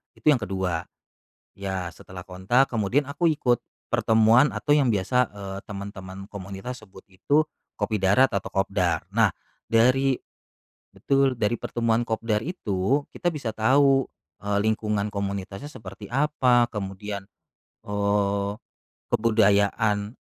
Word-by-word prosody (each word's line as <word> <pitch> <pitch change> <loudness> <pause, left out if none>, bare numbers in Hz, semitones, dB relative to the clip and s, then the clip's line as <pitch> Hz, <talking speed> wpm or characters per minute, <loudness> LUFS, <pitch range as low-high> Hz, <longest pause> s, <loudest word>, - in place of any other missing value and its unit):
itu - - -23
yang 135 - +3
ke-2. 95 -5 -2 0.7
Ya 95 -3 -3
setelah 90 +1 -11
kontak 95 +9 +1
kemudian 115 +5 +1
aku 170 +4 0
ikut 130 -7 +2 0.3
pertemuan 115 +5 +4
atau 145 - -4
yang 145 -2 +5
biasa, 120 +4 +2
eee, 100 -1 -6
temen-temen 100 -1 -8
komunitas 100 +5 -7
sebut 95 0 -15
itu 140 +11 +2 0.3
kopi 110 -2 -1
darat 105 +8 +4
atau 100 -3 -2
kopdar. 95 -4 +1
Nah, - - +3 0.3
dari 130 +4 +3 0.8
betul, 135 -1 +2
dari 115 0 0
pertemuan 115 0 0
kopdar 110 -1 0
itu 110 - 0
kita 175 -2 -2
bisa 130 -6 -3
tahu, 135 +5 +3 0.3
eee, 100 0 -1
lingkungan 105 -1 0
komunitasnya 100 +3 -4
seperti 100 -7 -10
apa, 125 -2 +2
kemudian, 100 -1 -5 0.6
eee, 100 -1 0 0.6
kebudayaan 105 0 +2
105 Hz, 120 wpm, -25 LUFS, 100-125 Hz, 0.8 s, yang